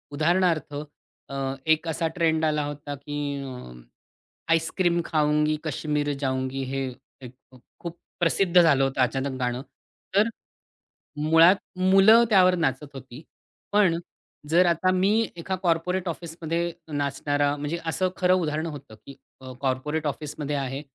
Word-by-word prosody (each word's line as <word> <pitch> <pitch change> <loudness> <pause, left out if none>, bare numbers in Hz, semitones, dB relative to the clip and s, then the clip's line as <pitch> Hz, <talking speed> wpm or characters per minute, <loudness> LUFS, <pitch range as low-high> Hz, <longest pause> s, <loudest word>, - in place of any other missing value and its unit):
उदाहरणार्थ 165 -1 +1 0.6
अ, 140 - -6 0.3
एक 160 +1 +2
असा 165 +1 -1
ट्रेंड 160 -2 +2
आला 150 -1 +1
होता, 145 0 -6
की 145 +1 -7 0.3
अ, 125 - -8 0.8
आईस्क्रीम 170 +1 +1
खाऊंगी, 150 -1 +1
कश्मीर 150 -1 -1
जाऊंगी 130 0 -2
हे 135 0 -1 0.4
एक 125 - -10 0.2
अ, - - -14 0.2
खूप 170 0 -7 0.2
प्रसिद्ध 175 +1 +3
झालं 140 -5 +4
होतं 135 -1 0
अचानक 130 +1 -1
गाणं. 125 0 -1 0.5
तर 210 +3 +4 0.9
मुळात 165 +4 +6 0.2
मुलं 195 +5 +6
त्यावर 185 -3 +5
नाचत 145 -4 -1
होती. 130 +2 -10 0.5
पण 190 -5 +4 0.5
जर 175 +3 +5
आता 175 +2 +2
मी 185 +2 +2 0.3
एका 185 +3 -3
कॉर्पोरेट 180 +2 0
ऑफिसमध्ये 165 0 -4 0.4
नाचणारा 145 +1 0
म्हणजे 145 +3 -3
असं 185 +3 0
खरं 180 0 +3
उदाहरण 155 -3 -1
होतं, 140 -7 -9
की 140 - -10 0.3
अ, 130 -1 -9
कॉर्पोरेट 150 +4 -1
ऑफिसमध्ये 150 0 -4
आहे 135 0 -3
155 Hz, 130 wpm, -25 LUFS, 140-170 Hz, 0.9 s, मुळात